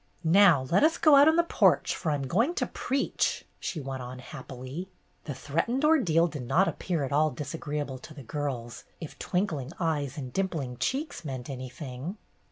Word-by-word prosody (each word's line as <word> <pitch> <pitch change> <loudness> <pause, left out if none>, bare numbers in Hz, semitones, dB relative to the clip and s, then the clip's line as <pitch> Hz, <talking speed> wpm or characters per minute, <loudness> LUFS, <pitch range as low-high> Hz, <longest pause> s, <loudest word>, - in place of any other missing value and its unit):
"Now 170 -4 +6
let 185 - +4
us 320 +1 +4
go 305 -3 +6
out 280 +2 +8
on 320 - +5
the 340 - +4
porch, 335 - +3
for 160 - -2
I'm 145 -2 -1
going 230 - +1
to - - 0
preach," 270 +1 -1
she 165 - -3
went 135 -2 -5
on 125 +1 -7
happily. 130 +5 -8 0.4
The 145 - -4
threatened 230 - -1
ordeal 185 - +4
did 150 -5 -4
not 180 +10 +4
appear 170 -6 -2
at 135 - -3
all 155 +2 +4
disagreeable 145 -1 -4
to 155 - -11
the 140 - -9
girls, 120 -3 -4 0.2
if 160 - -9
twinkling 165 -7 -2
eyes 150 -5 -1
and 130 -4 -6
dimpling 160 -10 -2
cheeks 280 - -2
meant 130 -2 -5
anything. 130 - -6
150 Hz, 175 wpm, -28 LUFS, 135-190 Hz, 0.4 s, out